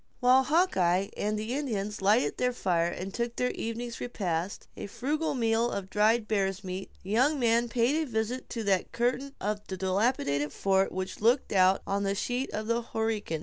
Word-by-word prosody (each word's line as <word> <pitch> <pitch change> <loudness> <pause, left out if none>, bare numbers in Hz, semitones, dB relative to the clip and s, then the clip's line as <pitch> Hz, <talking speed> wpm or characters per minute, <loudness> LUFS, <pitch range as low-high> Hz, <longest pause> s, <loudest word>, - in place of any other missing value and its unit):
While 255 +1 +5
Hawkeye 195 - +2
and 210 +1 -1
the 215 +3 -3
Indians 210 -8 -3
lighted 210 +6 +3
their 250 0 +1
fire 175 -7 +1
and 190 +2 -6
took 235 0 -2
their 250 0 0
evening's 235 +1 -5
repast, 185 -6 -3
a - - -6
frugal 295 +9 -2
meal 230 -1 +2
of 190 -3 -5
dried 215 +2 +3
bear's 195 -2 0
meat, 185 +1 -5
the 190 - -7
young 260 +7 +3
man 235 0 +2
paid 240 +4 +2
a - - -1
visit 225 +3 -2
to 230 - -4
that 195 -3 +1
curtain 260 +4 -1
of 210 +1 -2
the 190 - -5
dilapidated 185 - 0
fort 195 0 +2
which 185 +1 -5
looked 240 +5 +3
out 185 0 +4
on 200 +1 -1
the 200 0 0
sheet 245 +6 -2
of 215 0 -3
the 230 +1 0
Horican. 220 -8 -2
220 Hz, 190 wpm, -29 LUFS, 195-245 Hz, -, While